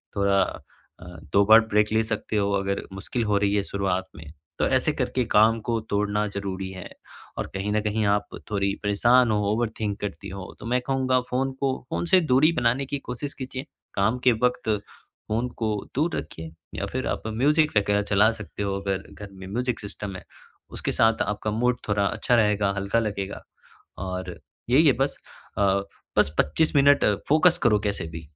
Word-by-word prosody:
थोड़ा 100 Hz, -1 st, +3 dB, 0.6 s
अ, -, -, -12 dB, 0.3 s
2 100 Hz, -, +6 dB
बार 110 Hz, -, +10 dB
ब्रेक 105 Hz, 0 st, +2 dB
ले 110 Hz, -, +4 dB
सकते 110 Hz, -1 st, -3 dB
हो 100 Hz, 0 st, +1 dB
अगर 100 Hz, 0 st, -1 dB
मुश्किल 105 Hz, +5 st, -3 dB
हो 105 Hz, -1 st, +2 dB
रही 100 Hz, 0 st, +1 dB
है 100 Hz, -, +1 dB
शुरुआत 95 Hz, -2 st, -2 dB
में, 80 Hz, -, -10 dB, 0.3 s
तो -, -, +2 dB
ऐसे 130 Hz, +4 st, +2 dB
करके 125 Hz, -2 st, -1 dB
काम 110 Hz, +2 st, +5 dB
को 115 Hz, -1 st, +1 dB
तोड़ना 105 Hz, +1 st, 0 dB
ज़रूरी 95 Hz, -1 st, -4 dB
है, 95 Hz, -1 st, -8 dB, 0.5 s
और -, -, -3 dB
कहीं 100 Hz, +2 st, -2 dB
न 105 Hz, -, +2 dB
कहीं 105 Hz, 0 st, 0 dB
आप 105 Hz, 0 st, +1 dB, 0.2 s
थोड़ी 100 Hz, -1 st, +1 dB
परेशान 120 Hz, +4 st, +4 dB
हो, 105 Hz, -, +2 dB
ओवरथिंक 110 Hz, -2 st, -2 dB
करती 100 Hz, -1 st, -5 dB
हो, 95 Hz, 0 st, -8 dB
तो -, -, -9 dB
मैं 125 Hz, +2 st, +1 dB
कहूँगा 130 Hz, -1 st, +2 dB
फ़ोन 135 Hz, +2 st, 0 dB
को 135 Hz, -1 st, +1 dB
फ़ोन -, -, -2 dB
से 185 Hz, +2 st, +5 dB
दूरी 155 Hz, +1 st, +4 dB
बनाने 125 Hz, +3 st, +1 dB
की 140 Hz, +2 st, -3 dB
कोशिश 140 Hz, +4 st, -4 dB
कीजिए, 130 Hz, +1 st, -6 dB, 0.3 s
काम 110 Hz, +5 st, +2 dB
के 125 Hz, -, +6 dB
वक़्त 125 Hz, -2 st, +1 dB, 0.6 s
फ़ोन 115 Hz, +3 st, 0 dB
को 110 Hz, -, -1 dB, 0.3 s
दूर 155 Hz, +5 st, +1 dB
रखिए, 80 Hz, +1 st, -7 dB, 0.2 s
या -, -, -2 dB
फिर -, -, -2 dB
आप -, -, -2 dB
म्यूजिक 150 Hz, +8 st, +2 dB
वग़ैरह 105 Hz, 0 st, +2 dB
चला 105 Hz, +2 st, +6 dB
सकते 110 Hz, -2 st, -7 dB
हो 100 Hz, -1 st, -1 dB
अगर 100 Hz, -1 st, -2 dB
घर 105 Hz, -, -9 dB
में 95 Hz, 0 st, -10 dB
म्यूजिक 120 Hz, +4 st, -2 dB
सिस्टम 100 Hz, -1 st, -6 dB
है, 95 Hz, -, -8 dB, 0.5 s
उसके -, -, -3 dB
साथ 115 Hz, 0 st, +3 dB
आपका 105 Hz, +1 st, -2 dB
मूड 125 Hz, +3 st, +1 dB
थोड़ा 100 Hz, -1 st, +2 dB
अच्छा 120 Hz, +5 st, +1 dB
रहेगा, 105 Hz, -3 st, +2 dB
हल्का 100 Hz, +4 st, +1 dB
लगेगा। 100 Hz, -3 st, -3 dB, 0.6 s
और 95 Hz, 0 st, -5 dB, 0.3 s
यही 145 Hz, +6 st, +5 dB
है 135 Hz, -, +6 dB
बस 135 Hz, +2 st, +1 dB, 0.4 s
अ, 100 Hz, -1 st, +3 dB, 0.4 s
बस -, -, +5 dB
25 155 Hz, -, +2 dB
मिनट 140 Hz, 0 st, +5 dB, 0.2 s
फोकस 165 Hz, +4 st, +5 dB
करो 110 Hz, -4 st, +4 dB
कैसे 100 Hz, -3 st, -2 dB
भी 80 Hz, +1 st, -7 dB
105 Hz, 185 wpm, -25 LUFS, 100-125 Hz, 0.6 s, बार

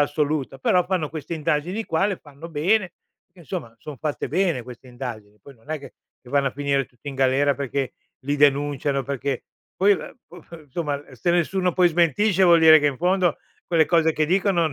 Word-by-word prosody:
assoluta, 145 Hz, -2 st, -1 dB
però 180 Hz, +6 st, +2 dB
fanno 180 Hz, -5 st, -1 dB
queste 155 Hz, +2 st, -6 dB
indagini 160 Hz, +7 st, -1 dB
qua, 165 Hz, +5 st, +1 dB
le 195 Hz, -3 st, -2 dB
fanno 145 Hz, +3 st, -12 dB
bene, 180 Hz, +5 st, +1 dB, 0.3 s
perché, 180 Hz, 0 st, -21 dB
insomma, 155 Hz, -8 st, -6 dB
son 150 Hz, -3 st, -9 dB
fatte 150 Hz, +2 st, -3 dB
bene 170 Hz, -7 st, 0 dB
queste 125 Hz, +1 st, -12 dB
indagini. 110 Hz, -5 st, -8 dB
Poi 140 Hz, +4 st, -14 dB
non 115 Hz, +7 st, -16 dB
è 155 Hz, -, -2 dB
che 140 Hz, -, -13 dB, 0.3 s
che 125 Hz, -, -16 dB
vanno 140 Hz, -1 st, +2 dB
a -, -, -7 dB
finire 140 Hz, -1 st, 0 dB
tutti 125 Hz, +3 st, -12 dB
in 135 Hz, -, -6 dB
galera 135 Hz, +2 st, +2 dB
perché 140 Hz, -1 st, -3 dB, 0.3 s
li 145 Hz, +2 st, -2 dB
denunciano 145 Hz, -1 st, +2 dB
perché 140 Hz, -1 st, -3 dB, 0.3 s
poi 200 Hz, +2 st, +3 dB
ehm, 195 Hz, -, -5 dB
p 180 Hz, -, -12 dB
p -, -, -29 dB
insomma 145 Hz, 0 st, -3 dB
se 175 Hz, +7 st, 0 dB
nessuno 180 Hz, +1 st, +1 dB
poi 180 Hz, 0 st, +4 dB
smentisce 175 Hz, +4 st, +2 dB
vuol 170 Hz, -2 st, +6 dB
dire 160 Hz, -1 st, +8 dB
che 145 Hz, -, +1 dB
in 140 Hz, -3 st, 0 dB
fondo 180 Hz, 0 st, +1 dB, 0.3 s
quelle 165 Hz, -3 st, +3 dB
cose 165 Hz, -2 st, +3 dB
che 155 Hz, -, +1 dB
dicono 175 Hz, -2 st, +1 dB
150 Hz, 200 wpm, -23 LUFS, 140-175 Hz, 0.3 s, dire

